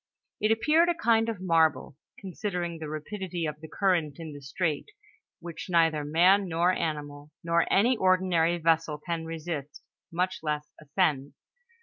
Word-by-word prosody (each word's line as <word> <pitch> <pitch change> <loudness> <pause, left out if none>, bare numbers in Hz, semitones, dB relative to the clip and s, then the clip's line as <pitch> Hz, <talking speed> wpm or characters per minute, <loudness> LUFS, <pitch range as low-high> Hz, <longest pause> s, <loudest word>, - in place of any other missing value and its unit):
It 215 +1 +2
appeared 310 +10 +3
a 345 - +1
kind 230 -7 +2
of 220 -5 -4
marvel, 160 -7 +2 0.2
considering 180 -3 -4
the 155 -2 -6
rapidity 175 +2 -4
of 150 0 -5
the 160 - -8
current 170 -6 0
in 160 -2 -8
the 145 - -10
strait, 150 +2 -2 0.5
which 170 +1 -8
neither 165 -3 +3
man 180 +6 +4
nor 170 +1 +2
animal, 150 -4 -4
nor 170 0 +1
any 235 +6 +4
ordinary 185 -3 +2
vessel 165 -2 +1
can 165 +2 -4
resist, 160 -3 -6 0.3
much 180 +2 -1
less 150 -1 -3
ascend. 150 -3 0
165 Hz, 145 wpm, -28 LUFS, 155-185 Hz, 0.5 s, man